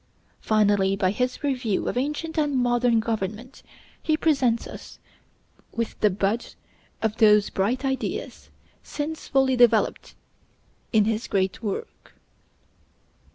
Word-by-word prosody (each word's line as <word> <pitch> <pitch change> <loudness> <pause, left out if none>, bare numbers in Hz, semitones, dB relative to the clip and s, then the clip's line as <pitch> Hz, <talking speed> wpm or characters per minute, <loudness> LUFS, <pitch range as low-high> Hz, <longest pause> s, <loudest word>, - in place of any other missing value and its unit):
Finally, 205 -3 +2
by 190 -2 +1
his 250 +6 -2
review 250 -8 -1
of - - -2
ancient 300 +5 -2
and 295 -3 0
modern 240 -1 +2
government, 220 +3 -4 0.4
he 310 -1 +1
presents 265 -8 +1
us - - -10 0.8
with 230 -1 -3
the 210 - +4
bud 200 +4 -2 0.5
of 220 0 0
those 210 -2 +5
bright 240 +8 -1
ideas 265 0 -4 0.3
since 310 +2 -5
fully 265 -1 +2
developed 235 -3 +2 0.8
in 215 -3 +4
his 225 +2 -1
great 190 -1 -1
work. 205 -4 -6
230 Hz, 115 wpm, -24 LUFS, 210-260 Hz, 0.8 s, those